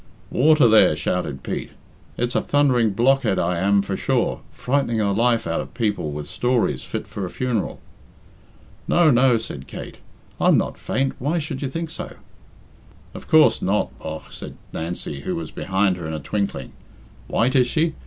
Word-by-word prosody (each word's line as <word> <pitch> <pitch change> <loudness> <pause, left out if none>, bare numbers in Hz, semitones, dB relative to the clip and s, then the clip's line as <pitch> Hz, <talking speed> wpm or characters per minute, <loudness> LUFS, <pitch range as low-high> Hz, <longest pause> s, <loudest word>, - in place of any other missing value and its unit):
"Water, 150 -1 +5
there," 110 -8 +6
shouted 75 -2 -2
Pete. - - -4 0.4
"It's 120 0 -1
a - - +2
thundering 130 -6 +3
blockhead 120 0 +2
I 85 0 0
am 100 +1 +3
for 100 - -3
sure - - 0
frightning 130 -3 0
the 105 -2 +1
life 115 +2 +2
out 85 0 -1
of - - -10
people 105 -9 -1
with 75 0 -6
stories 120 - 0
fit - - -5
for 100 - -6
a 90 - -3
funeral." 120 0 -2 1.1
"No, 170 -3 +5
no," 125 -1 +4
said 70 -11 -7
Kate; - - -9 0.4
"I'm - - +5
not - - -2
faint 135 0 -1
Why 150 +7 0
should 145 -4 -4
you 140 - -2
think 165 +3 -4
so?" - - -7 1.0
"Of - - -10
coorse, 155 -8 +5
not, 105 +2 0
bogh," 80 0 -7
said - - -9 0.2
Nancy, 80 -4 -5
who - - -3
was 80 -2 -5
behind 95 0 0
her 85 -3 -6
in 80 - -4
a - - -4
twinkling. 100 -6 -3 0.6
"White 125 +4 +1
is 125 -2 +5
she? 160 +4 +1
110 Hz, 175 wpm, -22 LUFS, 90-130 Hz, 1.1 s, there